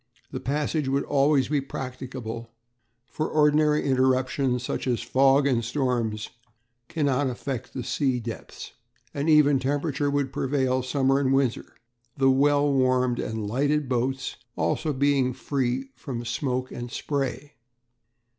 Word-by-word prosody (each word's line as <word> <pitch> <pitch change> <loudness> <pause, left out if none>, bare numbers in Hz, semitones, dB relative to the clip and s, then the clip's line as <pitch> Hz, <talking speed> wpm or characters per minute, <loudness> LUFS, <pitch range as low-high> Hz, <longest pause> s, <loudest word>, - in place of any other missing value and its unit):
The - - -4
passage 150 +2 -1
would 140 +1 +1
be - - -13
always 140 -1 +3 0.2
practicable, 125 -3 -6 0.6
for 155 +4 -3
ordinary 150 0 +3
interruptions 130 -1 +1
such 125 - -3
as 120 -2 0
fog 135 +1 +4
and 125 -4 +2
storms 115 -4 -1 0.6
cannot 145 -3 0
affect 125 0 -5
the 130 - -3
sea 130 -1 0
depths. 115 -2 -8 0.4
An 145 +3 -1
even 145 -3 +5
temperature 145 +2 -1
would 140 -2 -1
prevail 130 -1 0
summer 135 +1 +1
and 135 -2 +1
winter, 135 -3 0 0.4
the 135 -1 +4
well 145 +1 +3
warmed 130 -2 +2
and 110 -1 -3
lighted 145 +5 0
boats 130 +1 -1 0.2
being 140 -3 +1
also 130 - -3
free 130 0 -2
from 120 -1 -6
smoke 125 +2 -2
and 120 0 -6
spray. 140 +1 -3
135 Hz, 130 wpm, -26 LUFS, 125-145 Hz, 0.6 s, even